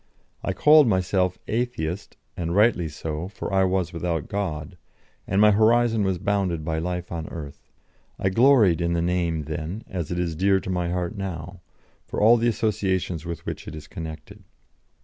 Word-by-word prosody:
I -, -, -1 dB
called 150 Hz, -2 st, +6 dB
myself 95 Hz, -2 st, +1 dB
Atheist, 105 Hz, -7 st, -3 dB, 0.2 s
and 85 Hz, 0 st, -2 dB
rightly 105 Hz, -5 st, +3 dB
so, 75 Hz, +2 st, -5 dB
for 100 Hz, 0 st, -6 dB
I 95 Hz, 0 st, +4 dB
was 90 Hz, -2 st, 0 dB
without 85 Hz, -3 st, -2 dB
God, 90 Hz, -4 st, -3 dB, 0.5 s
and 95 Hz, -, +1 dB
my 105 Hz, 0 st, +7 dB
horizon 115 Hz, +1 st, +3 dB
was 95 Hz, -2 st, 0 dB
bounded 95 Hz, -4 st, -1 dB
by 80 Hz, -1 st, -1 dB
life 90 Hz, +1 st, -4 dB
on 80 Hz, -2 st, -4 dB
earth; 75 Hz, -4 st, -9 dB, 0.5 s
I 95 Hz, -, 0 dB
gloried 110 Hz, -, +5 dB
in 85 Hz, 0 st, 0 dB
the 85 Hz, -, +1 dB
name 85 Hz, -3 st, 0 dB
then, 80 Hz, +7 st, -5 dB
as 85 Hz, -5 st, -4 dB
it 90 Hz, -, -3 dB
is 85 Hz, -2 st, -1 dB
dear 95 Hz, +3 st, +3 dB
to 95 Hz, -, -4 dB
my 90 Hz, -1 st, -1 dB
heart 90 Hz, -1 st, -2 dB
now, 90 Hz, -2 st, -6 dB, 0.5 s
for -, -, -4 dB
all 115 Hz, +3 st, +6 dB
the 120 Hz, +1 st, +1 dB
associations 95 Hz, -7 st, -1 dB
with 85 Hz, -1 st, -6 dB
which -, -, -6 dB
it -, -, -6 dB
is 75 Hz, -1 st, -10 dB
connected. 80 Hz, -1 st, -8 dB
90 Hz, 175 wpm, -24 LUFS, 85-100 Hz, 0.5 s, my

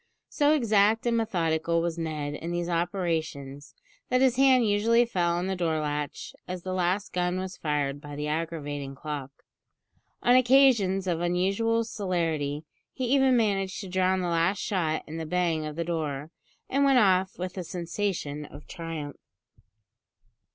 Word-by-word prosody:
So 295 Hz, +1 st, +3 dB
exact 220 Hz, -4 st, +3 dB
and 235 Hz, -1 st, +2 dB
methodical 170 Hz, -7 st, 0 dB
was 170 Hz, 0 st, -2 dB
Ned 155 Hz, -3 st, -3 dB
in 165 Hz, +3 st, -5 dB
these 175 Hz, 0 st, -2 dB
operations, 160 Hz, -6 st, -2 dB, 0.3 s
that 255 Hz, -, +3 dB
his 260 Hz, -2 st, +4 dB
hand 260 Hz, -2 st, +5 dB
usually 230 Hz, +4 st, +3 dB
fell 175 Hz, -6 st, 0 dB
on 175 Hz, +1 st, -1 dB
the 190 Hz, 0 st, -1 dB
door 165 Hz, -3 st, 0 dB
latch 150 Hz, -1 st, -4 dB
as 180 Hz, -1 st, -5 dB
the 185 Hz, -, -3 dB
last 185 Hz, +3 st, 0 dB
gun 180 Hz, 0 st, 0 dB
was 185 Hz, 0 st, -5 dB
fired 145 Hz, -2 st, -2 dB
by 145 Hz, -1 st, -8 dB
the 150 Hz, +1 st, -3 dB
aggravating 145 Hz, -3 st, -3 dB
clock. 145 Hz, -2 st, -5 dB, 0.9 s
On 245 Hz, -, +5 dB
occasions 245 Hz, -7 st, +4 dB
of 170 Hz, -2 st, -1 dB
unusual 195 Hz, +6 st, +1 dB
celerity 165 Hz, -9 st, -2 dB, 0.3 s
he 255 Hz, 0 st, -1 dB
even 265 Hz, -2 st, +4 dB
managed 195 Hz, -4 st, 0 dB
to 195 Hz, -, -7 dB
drown 185 Hz, 0 st, +1 dB
the 180 Hz, -, -1 dB
last 170 Hz, +3 st, +1 dB
shot 165 Hz, -7 st, -1 dB
in 160 Hz, +1 st, -7 dB
the 165 Hz, -, -4 dB
bang 165 Hz, -2 st, 0 dB
of 150 Hz, -, -6 dB
the 170 Hz, -, -1 dB
door, 155 Hz, -3 st, -3 dB, 0.4 s
and 275 Hz, +1 st, +1 dB
went 275 Hz, -2 st, +5 dB
off 190 Hz, -4 st, +3 dB
with 180 Hz, 0 st, -5 dB
a 185 Hz, -, -4 dB
sensation 170 Hz, -4 st, -3 dB
of 145 Hz, 0 st, -12 dB
triumph. 165 Hz, -5 st, -6 dB
175 Hz, 160 wpm, -27 LUFS, 155-205 Hz, 0.9 s, hand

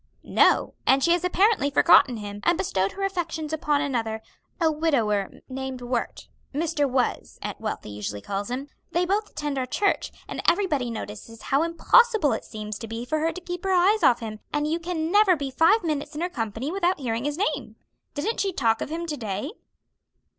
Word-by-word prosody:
"No, -, -, +3 dB
and 270 Hz, 0 st, +5 dB
she 340 Hz, -, +4 dB
has 345 Hz, 0 st, +2 dB
apparently 375 Hz, -3 st, +3 dB
forgotten 255 Hz, -3 st, +5 dB
him, 205 Hz, -1 st, -6 dB
and 345 Hz, 0 st, +3 dB
bestowed 195 Hz, -, 0 dB
her 395 Hz, -, -5 dB
affections 335 Hz, -5 st, -2 dB
upon 295 Hz, -2 st, +1 dB
another; 225 Hz, -6 st, -2 dB, 0.4 s
a 325 Hz, -2 st, +3 dB
widower 235 Hz, -11 st, +1 dB, 0.2 s
named 265 Hz, -1 st, -5 dB
Wert. 240 Hz, -1 st, -3 dB, 0.3 s
Mr. 305 Hz, -2 st, 0 dB
Was, 255 Hz, -1 st, -1 dB
Aunt -, -, -5 dB
Wealthy -, -, -4 dB
usually 105 Hz, 0 st, -5 dB
calls 200 Hz, -, -4 dB
him. 260 Hz, +3 st, -4 dB, 0.3 s
They 350 Hz, +1 st, +2 dB
both 410 Hz, +3 st, 0 dB
attend 295 Hz, -2 st, -3 dB
our 255 Hz, -, -2 dB
church, 400 Hz, +10 st, 0 dB, 0.2 s
and -, -, -5 dB
everybody 315 Hz, -9 st, +1 dB
notices 220 Hz, 0 st, -7 dB
how 275 Hz, +2 st, +2 dB
impossible 335 Hz, -, +4 dB
it 220 Hz, -, -4 dB
seems 210 Hz, -1 st, -6 dB
to 225 Hz, -, -6 dB
be 225 Hz, +2 st, -5 dB
for 310 Hz, +5 st, -1 dB
her 325 Hz, +2 st, +1 dB
to 370 Hz, -, -8 dB
keep 355 Hz, 0 st, -6 dB
her 385 Hz, -1 st, +1 dB
eyes 380 Hz, +4 st, +4 dB
off 240 Hz, -1 st, +4 dB
him; 215 Hz, -1 st, -6 dB
and 295 Hz, 0 st, 0 dB
you 325 Hz, +2 st, 0 dB
can 335 Hz, -1 st, -2 dB
never 410 Hz, -2 st, +5 dB
be 280 Hz, -3 st, -4 dB
five 330 Hz, -, +4 dB
minutes 300 Hz, -2 st, -2 dB
in 305 Hz, -, -4 dB
her 355 Hz, -, 0 dB
company 225 Hz, -, -3 dB
without 365 Hz, -2 st, +1 dB
hearing 235 Hz, -1 st, -2 dB
his 295 Hz, +1 st, -2 dB
name. 405 Hz, -, -2 dB, 0.4 s
Didn't 320 Hz, +11 st, -2 dB
she 395 Hz, -, +1 dB
talk 230 Hz, -9 st, +1 dB
of -, -, -3 dB
him 335 Hz, +2 st, -3 dB
to 305 Hz, -3 st, -4 dB
day?" 215 Hz, +4 st, -4 dB
295 Hz, 195 wpm, -25 LUFS, 235-345 Hz, 0.4 s, and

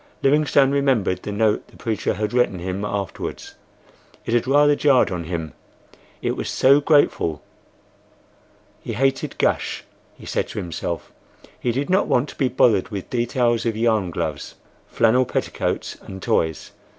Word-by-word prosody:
Livingstone 140 Hz, -1 st, +4 dB
remembered 130 Hz, -10 st, +1 dB
the -, -, -5 dB
note 105 Hz, +1 st, +1 dB
the -, -, -19 dB
preacher 110 Hz, -2 st, -2 dB
had 105 Hz, +2 st, -3 dB
written 120 Hz, -6 st, +2 dB
him 95 Hz, +3 st, -4 dB
afterwards—it 100 Hz, +3 st, -7 dB
had 120 Hz, +1 st, +1 dB
rather 145 Hz, +2 st, +5 dB
jarred 140 Hz, -7 st, +3 dB
on 85 Hz, -2 st, -4 dB
him, 80 Hz, -2 st, -4 dB, 0.7 s
it -, -, 0 dB
was -, -, -4 dB
so 140 Hz, +2 st, +4 dB
grateful. 145 Hz, -, +2 dB, 1.4 s
He 115 Hz, -, -5 dB
hated 135 Hz, +4 st, 0 dB
"gush," -, -, 0 dB, 0.3 s
he -, -, -13 dB
said -, -, -1 dB
to -, -, -9 dB
himself; 85 Hz, -3 st, -4 dB, 0.5 s
he 120 Hz, -, 0 dB
did 135 Hz, +4 st, -2 dB
not 190 Hz, +2 st, +3 dB
want 125 Hz, +4 st, +1 dB
to -, -, -11 dB
be 135 Hz, -, +1 dB
bothered 115 Hz, -5 st, +2 dB
with 100 Hz, -4 st, -6 dB
details 120 Hz, -1 st, +1 dB
of 115 Hz, -2 st, -1 dB
yarn 110 Hz, -5 st, +1 dB
gloves, 85 Hz, -, -4 dB, 0.3 s
flannel 115 Hz, +3 st, +3 dB
petticoats, -, -, -3 dB
and 95 Hz, -, -9 dB
toys. 80 Hz, -3 st, -1 dB
115 Hz, 150 wpm, -22 LUFS, 95-135 Hz, 1.4 s, rather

